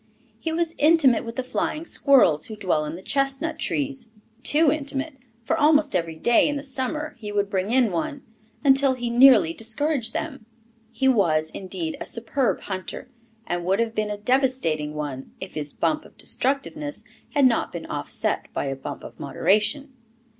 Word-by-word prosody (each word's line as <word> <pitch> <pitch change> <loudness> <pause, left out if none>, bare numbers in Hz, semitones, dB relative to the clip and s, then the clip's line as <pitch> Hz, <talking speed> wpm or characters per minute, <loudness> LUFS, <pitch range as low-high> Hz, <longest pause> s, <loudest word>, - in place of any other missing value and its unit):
He 325 - -3
was 330 0 -1
intimate 295 -6 +5
with 230 0 -7
the 260 - -2
flying 305 +5 -2
squirrels 250 - +4
who 220 - -7
dwell 180 -7 0
in 150 +2 -5
the 185 - -10
chestnut 275 +4 -1
trees, 275 -5 -2 0.3
too 300 +3 +4
intimate, 290 0 -3 0.3
for - - 0
almost 300 -5 +3
every 165 -2 -1
day 235 +9 +3
in 290 - -2
the 285 - -4
summer 285 +2 -3
he 210 -2 -6
would 205 -1 -1
bring 190 +1 -1
in 245 -3 +3
one, 260 - -3 0.4
until 270 -1 +4
he 240 -1 -3
nearly 235 -9 +6
discouraged 230 - 0
them. 270 -7 -5 0.4
He 235 +3 0
was, 160 -11 +2
indeed, 180 -4 -4
a - - -3
superb 240 +2 -1
hunter, 190 +5 -6 0.4
and 175 0 -2
would 190 +4 +1
have 230 -1 0
been 215 -1 -1
a 210 - -3
devastating 210 - 0
one, 140 -3 -5
if 190 - -8
his 150 -1 -3
bump 305 0 0
of - - -18
destructiveness 290 +2 -2 0.3
had 285 -2 +5
not 240 -3 +2
been - - -6
offset - - -1
by - - -1
a 135 -1 -2
bump 135 - -7
of - - -11
moderation. 265 +8 +1
245 Hz, 175 wpm, -24 LUFS, 190-280 Hz, 0.4 s, nearly